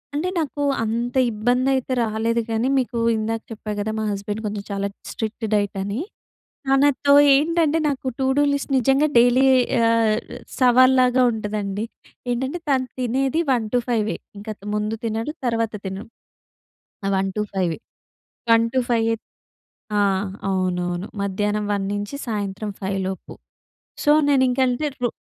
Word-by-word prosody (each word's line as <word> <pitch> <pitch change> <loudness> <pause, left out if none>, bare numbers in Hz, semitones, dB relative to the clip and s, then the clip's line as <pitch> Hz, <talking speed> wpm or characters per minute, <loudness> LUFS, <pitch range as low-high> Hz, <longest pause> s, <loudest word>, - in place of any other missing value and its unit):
అంటే 340 +5 0
నాకు 290 -2 -3 0.2
అంత 235 +3 -2 0.2
ఇబ్బంది 245 +5 +1
అయితే 260 0 -2
రాలేదు 225 +1 0
కానీ, 225 +3 +1
మీకు 245 -2 -1 0.2
ఇందాక 225 +1 -2
చెప్పా 215 -1 -6
కదా! 215 +1 -1
మా - - -1
హస్బెండ్ 205 +2 -4
కొంచెం 205 -1 -3
చాలా 200 0 -1 0.2
స్ట్రిక్ట్ 220 +1 -4
డైట్ 205 -1 +1
అని. 205 +5 -3 0.7
తనతో 280 +1 +3 0.2
ఏంటంటే 320 +2 +2
నాకు 275 -2 -2
టూ 265 - +1
డూ - - +5
లిస్ట్ 280 0 -3
నిజంగా 270 +4 +3
డైలీ 245 +2 +5 0.5
ఆహ్, 225 -2 +3 0.4
సవాల్లాగా 255 0 +5
ఉంటుందండి. 210 -1 -3 0.5
ఏంటంటే 265 +7 -2
తను 260 -2 +2
తినేది 265 +5 0
1:00-5:00 235 -2 0 0.2
ఇంక 205 - -11 0.3
ముందు 210 +1 -1
తినడు 225 +6 -2
తర్వాత 230 -2 0
తినడు. 190 +4 -6 1.0
అ - - +1
one 195 0 0
two 210 - 0
ఫైవే 180 -4 0 0.8
one 230 0 +5
two 260 - +3
five. 225 -1 +2 0.9
ఆహ్. 195 -1 +2 0.2
అవునవును. 180 0 -1 0.2
మధ్యాహ్నం 205 +2 -1
1:00 200 -1 -1
నుంచి 205 +6 -4
సాయంత్రం 205 -1 -3
5:00 195 0 -1
లోపు. 190 - -7 0.7
సో, 295 - +4 0.2
నేనింకంటే 260 0 +2 0.2
రొ 240 - +3
225 Hz, 135 wpm, -22 LUFS, 205-255 Hz, 1.0 s, డూ